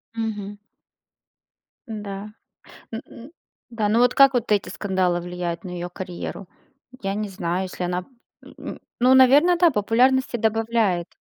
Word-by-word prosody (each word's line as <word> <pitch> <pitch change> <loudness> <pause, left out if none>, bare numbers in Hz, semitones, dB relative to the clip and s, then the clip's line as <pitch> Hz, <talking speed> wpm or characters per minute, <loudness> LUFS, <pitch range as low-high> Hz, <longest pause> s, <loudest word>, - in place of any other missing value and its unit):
Мгм. 210 -3 -4 1.3
Да. 205 -1 -6 0.6
М, 235 +4 -9 0.4
да, 220 -3 -1
ну 225 +3 +3
вот 245 0 +4
как 275 0 +6
вот 240 -3 -1
эти 205 -1 +2
скандалы 185 -3 0
влияют 175 -1 -4
на 185 - -7
её 175 0 -5
карьеру? 180 +1 -7 0.5
Я 195 -1 -2
не 210 -1 -3
знаю, 180 0 -2
если 185 -1 -5
она, 180 +1 -2 0.5
м. - - -8 0.2
Ну 255 +2 +5
наверное, 280 +7 +6
да. 345 0 +5
Популярности 250 +3 +2
добавляет. 220 -5 +1
210 Hz, 135 wpm, -23 LUFS, 185-240 Hz, 1.3 s, как